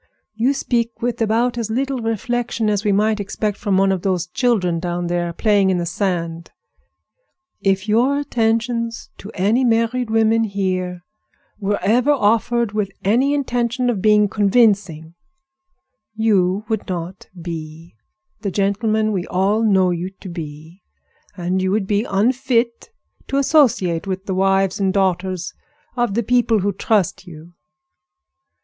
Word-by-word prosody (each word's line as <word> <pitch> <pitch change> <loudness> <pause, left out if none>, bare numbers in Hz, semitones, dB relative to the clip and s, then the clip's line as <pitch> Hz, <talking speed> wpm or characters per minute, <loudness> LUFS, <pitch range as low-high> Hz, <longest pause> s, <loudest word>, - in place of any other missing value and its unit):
You 240 +6 +1
speak 235 -3 -2
with 240 -1 -2
about 235 +2 +1
as 225 -2 -3
little 265 +3 -1
reflection 225 0 -1
as 205 -1 -1
we 210 - +2
might 215 +2 +2
expect 205 +1 -2
from 200 -3 0
one 195 0 +3
of 190 -2 -1
those 180 -3 0
children 180 -4 0
down 175 0 -3
there 175 0 -1
playing 200 +1 +2
in 185 - +1
the 175 - -2
sand. 170 -2 -3 1.1
If 195 +1 0
your 245 +6 +2
attentions 230 -3 -1
to 200 - -9
any 210 +7 +2
married 230 0 +1
women 225 0 +3
here 185 -3 -2 0.6
were 205 0 0
ever 240 +7 +2
offered 235 -3 +2
with 210 -2 -1
any 255 +8 +2
intention 245 -2 0
of 205 -5 -3
being 210 0 +4
convincing, 200 -6 +1 1.0
you 205 -2 +1
would 220 -3 -2
not 180 0 -6
be 165 0 -8 0.5
the 200 - -3
gentleman 215 +3 0
we 185 -3 -2
all 195 +4 +1
know 190 -4 +3
you 175 +1 -3
to 190 - -9
be, 160 +1 -9 0.6
and 180 +1 -1
you 190 - 0
would 200 +1 0
be 205 +3 0
unfit 235 - 0 0.4
to 275 - -1
associate 225 - +2
with 190 0 -4
the 190 - -2
wives 195 0 +1
and 190 -1 +1
daughters 185 -2 -1 0.4
of 240 -5 0
the 235 - +1
people 235 -2 +2
who 200 +1 0
trust 195 -2 0
you." 165 0 -12
205 Hz, 145 wpm, -20 LUFS, 185-230 Hz, 1.1 s, being